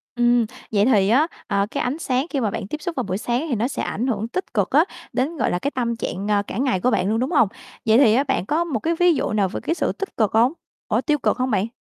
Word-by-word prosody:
Ừm, 240 -1 +3 0.3
vậy 205 -2 +3
thì 205 -6 +3
á, 275 +8 +4 0.2
ờ, 200 -2 +1
cái - - -2
ánh 265 +6 -2
sáng 260 -3 0
khi 280 - -1
mà 220 -5 0
bạn 195 - -4
tiếp 305 +4 -5
xúc 340 +1 -4
vào 255 - -1
buổi 190 0 -2
sáng 240 +7 -1
thì 255 - +1
nó 230 +3 0
sẽ - - -4
ảnh 235 +6 -2
hưởng 220 -3 -1
tích 360 +3 -5
cực 205 -4 +1
á 305 +5 +5 0.3
đến, 280 +6 -1
gọi - - +1
là, 175 - 0
cái 280 - -2
tâm 235 -3 -1
trạng 200 -3 -4 0.2
cả - - -5
ngày 255 -6 +1
của 250 +7 +1
bạn 195 -3 +1
luôn, 220 +1 +1
đúng 260 +7 -1
hông? 240 -9 +4 0.4
Vậy 220 0 +5
thì 240 -3 +5
bạn 230 -8 0
có 315 +7 +1
một 300 -10 -2
cái 330 +7 0
ví 355 -1 +5
dụ 290 - -1
nào 205 -3 +1
về - - -4
cái 330 - 0
sự - - 0
tích 395 - -7
cực 215 -4 +2
hông? 235 +6 +4 0.3
Ủa, - - +1
tiêu 300 -1 +1
cực - - +1
không 255 0 -1
bạn? 205 +1 +1
245 Hz, 290 wpm, -22 LUFS, 215-280 Hz, 0.4 s, á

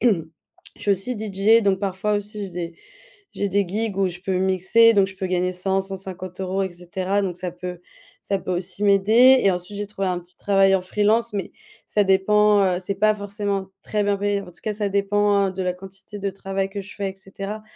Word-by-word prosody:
je 165 -9 -3
suis 205 - 0
aussi 200 +5 0
DJ, 215 +2 +3
donc 195 -1 +1
parfois 200 +2 -1
aussi, 205 0 -4
j'ai - - -10
des 170 -1 -5 0.6
j'ai 200 - -2
des 200 0 +2
gigs, 210 0 -2
où 190 -1 +2
je 175 0 -7
peux 190 0 -1
mixer, 190 +5 +4
donc 195 -2 +4
je 190 - -10
peux 190 - -3
gagner 180 0 0
100-150 190 0 -3
euros, 190 +1 -1
et 190 - -2
cetera. 180 +3 -2
Donc 180 -3 -2
ça 180 0 -4
peut 180 0 -7 0.4
ça 195 - -1
peut 185 - -6
aussi 180 +2 -3
m'aider, 220 +6 +6
et 195 - +6
ensuite, 180 +3 -5
j'ai 205 - -3
trouvé 195 -2 -3
un 180 -1 -1
petit 175 0 -16
travail 195 -1 +4
en 190 - +2
freelance, 210 +5 +1
mais 195 - -3 0.3
ça 210 - +2
dépend, 205 +2 +4
heu, 180 -2 +1
c'est 195 +2 -3
pas 215 +1 +3
forcément 200 -1 -3
très 210 -1 -1
bien 200 0 +1
payé. 205 0 0
En 195 - -10
tout 180 - -14
cas, 215 - -1
ça 210 -1 -1
dépend, 200 0 +2
heu, - - -4
de 190 0 -4
la 180 0 0
quantité 195 +2 -11
de 200 0 -2
travail 195 0 -3
que 200 0 -5
je 195 - -10
fais, 200 -2 -2
et - - -11
cetera. 195 +2 -7
195 Hz, 225 wpm, -23 LUFS, 185-205 Hz, 0.6 s, m'aider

